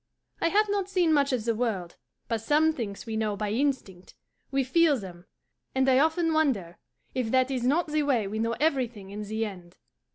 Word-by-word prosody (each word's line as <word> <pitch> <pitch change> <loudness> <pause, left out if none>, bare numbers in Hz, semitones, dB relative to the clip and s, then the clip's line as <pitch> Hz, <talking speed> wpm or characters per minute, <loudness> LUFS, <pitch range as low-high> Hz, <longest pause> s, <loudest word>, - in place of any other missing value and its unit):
I - - +3
have 420 +5 +3
not 400 -2 -1
seen 355 -4 +2
much 280 -2 +3
of 245 -4 -1
the 230 - +2
world, 215 -7 -2 0.3
but 225 -2 -1
some 305 +6 +3
things 220 -8 -5
we 225 -1 -4
know 215 -2 0
by 205 0 -3
instinct; 225 -8 -2 0.3
we 270 0 +1
feel 305 +2 +3
them; 180 -4 -10 0.5
and 265 0 +2
I 260 0 +5
often 320 +2 +2
wonder 240 - 0 0.3
if 255 -3 -1
that 260 +2 +2
is 255 -3 -2
not 325 +6 +2
the 305 0 +1
way 265 -7 +1
we 210 +3 -4
know 230 +1 0
everything 245 -9 -1
in 205 +1 -6
the 220 +2 -2
end. 180 -4 -10
250 Hz, 200 wpm, -27 LUFS, 210-300 Hz, 0.5 s, I